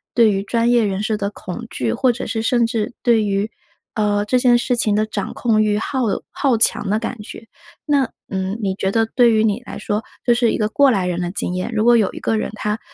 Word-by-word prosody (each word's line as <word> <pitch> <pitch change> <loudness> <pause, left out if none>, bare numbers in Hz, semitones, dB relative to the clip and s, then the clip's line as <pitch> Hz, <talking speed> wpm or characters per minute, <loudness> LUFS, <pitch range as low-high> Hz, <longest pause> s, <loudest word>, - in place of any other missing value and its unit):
对 230 -3 +5
于 195 -1 -1
专 230 +3 +1
业 240 -2 +4
人 195 0 -2
士 215 0 0
的 200 -1 -2
恐 210 +3 -8
惧， 115 -3 -2
或 255 - +2
者 240 - -5
是 225 - -2
甚 235 +1 +2
至 230 -1 -2
对 230 -3 +3
于， 200 +2 -1 0.4
呃， 205 -1 +1
这 250 +4 +2
件 245 -1 +4
事 245 0 -1
情 210 -3 +2
的 215 - +2
掌 210 -2 -4
控 220 -3 +1
欲， 210 -1 +1
好 260 +5 -3 0.3
好 265 -5 +1
强 210 -2 +2
的 215 +2 +1
感 230 -1 -5
觉。 225 - -10 0.4
那， 280 -5 +1 0.2
嗯， 190 +2 -3
你 195 -2 -1
觉 190 -1 -1
得 225 -1 +3
对 240 -1 +3
于 215 - +3
你 220 +2 0
来 - - -7
说， 210 +1 -2 0.2
就 240 - +5
是 235 -1 +2
一 - - -1
个 215 -1 0
过 280 +4 +4
来 195 -7 +1
人 180 -1 -2
的 175 - -2
经 180 - -3
验， 185 +5 -3
如 215 - +1
果 240 0 +6
有 210 -4 +1
一 - - -7
个 220 - 0
人 - - -2
他 210 +1 -2
220 Hz, 270 characters per minute, -19 LUFS, 205-235 Hz, 0.4 s, 果